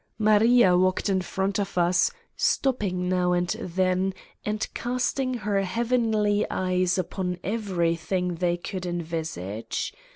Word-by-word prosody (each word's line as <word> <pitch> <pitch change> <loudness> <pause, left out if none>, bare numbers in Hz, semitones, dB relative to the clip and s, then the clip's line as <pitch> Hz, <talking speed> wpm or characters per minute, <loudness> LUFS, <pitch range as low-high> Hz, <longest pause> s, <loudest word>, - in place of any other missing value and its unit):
Maria 215 -2 +5
walked 185 +3 +2
in 190 -1 +2
front 190 +2 -1
of 200 -2 -3
us, 175 - +3 0.3
stopping 200 -9 0
now 180 -1 +2
and 175 0 0
then 185 +1 0 0.3
and 210 0 -2
casting 255 +1 -1
her 205 -3 0
heavenly 220 0 +1
eyes 185 -1 +1
upon 180 0 -2
everything 180 -4 -1
they 175 0 0
could 180 +1 -5
envisage. 160 - -4
185 Hz, 120 wpm, -26 LUFS, 180-210 Hz, 0.3 s, Maria